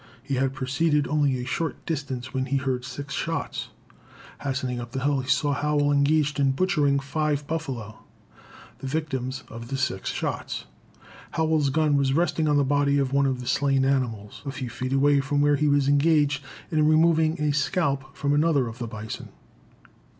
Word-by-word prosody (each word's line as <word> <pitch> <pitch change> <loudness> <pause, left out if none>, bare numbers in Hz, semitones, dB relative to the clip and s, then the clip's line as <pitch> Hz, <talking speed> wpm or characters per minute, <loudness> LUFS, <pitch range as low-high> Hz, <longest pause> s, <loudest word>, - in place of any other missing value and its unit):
He 140 - -4
had 135 0 0
proceeded 145 +3 +1
only 145 -3 +2
a 125 - -4
short 160 +5 -3
distance 135 -6 -4
when 130 0 -1
he 140 +1 +1
heard 130 -2 -1
six 140 +2 -6
shots. 165 +3 -3 0.7
Hastening 130 -3 -2
up 120 +2 -9
a - - 0
hill, 140 -1 +2
he 130 0 -5
saw 145 +2 +2
Howell 145 0 +1
engaged 145 +1 +2
in 135 -1 +3
butchering 150 -4 +2
five 145 +1 -1
buffalo, 135 -9 -4 0.8
the 135 - -6
victims 135 -3 -3
of 115 +1 -9
the 135 - -3
six 130 -8 -1
shots. - - -3 0.7
Howell's 160 -3 +2
gun 150 0 +2
was 135 -1 +2
resting 160 0 +1
on 145 -1 +3
the 145 - +4
body 140 +1 +2
of 135 -1 0
one 140 0 +3
of 130 -2 -1
the 125 - -8
slain 135 -2 +2
animals, 120 -7 -1
a 140 - -4
few 130 -3 -5
feet 130 +1 -4
away 140 +1 +4
from 145 +1 0
where 145 0 +4
he 150 +1 +1
was 145 -1 +3
engaged 145 -1 +3 0.3
in 155 -1 +3
removing 160 +1 +3
a 150 -1 +1
scalp 140 -2 0
from 145 0 +1
another 145 -4 +3
of 115 +1 -8
the 120 - -3
bison. 110 0 -7
140 Hz, 180 wpm, -25 LUFS, 130-150 Hz, 0.8 s, the